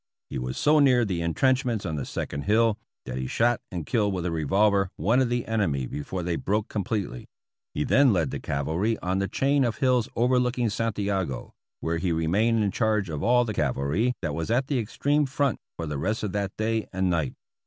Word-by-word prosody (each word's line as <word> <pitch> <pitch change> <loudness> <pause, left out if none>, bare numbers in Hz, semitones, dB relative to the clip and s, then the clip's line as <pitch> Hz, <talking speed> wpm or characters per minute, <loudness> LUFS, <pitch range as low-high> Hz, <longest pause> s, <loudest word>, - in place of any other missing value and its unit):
He 70 - -3
was 65 0 -4
so 150 +1 +4
near 125 -4 +5
the 90 -4 -2
intrenchments 120 +6 +1
on 80 - -2
the 70 - -3
second 70 0 -4
hill, 110 +1 +3 0.3
that 65 0 -4
he 65 - -3
shot 120 - +1
and 85 -4 -4
killed 105 +2 +1
with 90 -1 -3
a 90 - -1
revolver 95 +5 +2
one 120 +6 +2
of 130 - +1
the 120 0 -1
enemy 85 - 0
before 75 +8 -5
they 85 -1 -1
broke 105 +2 -1
completely. 100 - -3 0.5
He 75 - 0
then 140 - +4
led 85 -6 +1
the - - -4
cavalry 80 +11 -1
on 95 +1 0
the 100 - 0
chain 140 +4 +2
of 120 -3 -1
hills 125 -3 +2
Overlooking 125 -1 +2
Santiago, 100 - -2 0.3
where 80 0 -1
he 90 0 0
remained 105 +8 +2
in 100 - +1
charge 105 -5 0
of 75 - -4
all 120 +1 +4
the 110 - -3
cavalry 75 - 0
that 75 -3 -1
was 80 +5 -3
at 125 +4 +2
the 135 -2 0
extreme 145 +6 0
front 140 -1 0 0.2
for 85 - -3
the 75 -2 -3
rest 105 +9 -1
of 105 - -2
that 100 -1 -3
day 110 0 -1
and 95 -1 0
night. 80 -6 -1
105 Hz, 205 wpm, -26 LUFS, 85-120 Hz, 0.5 s, near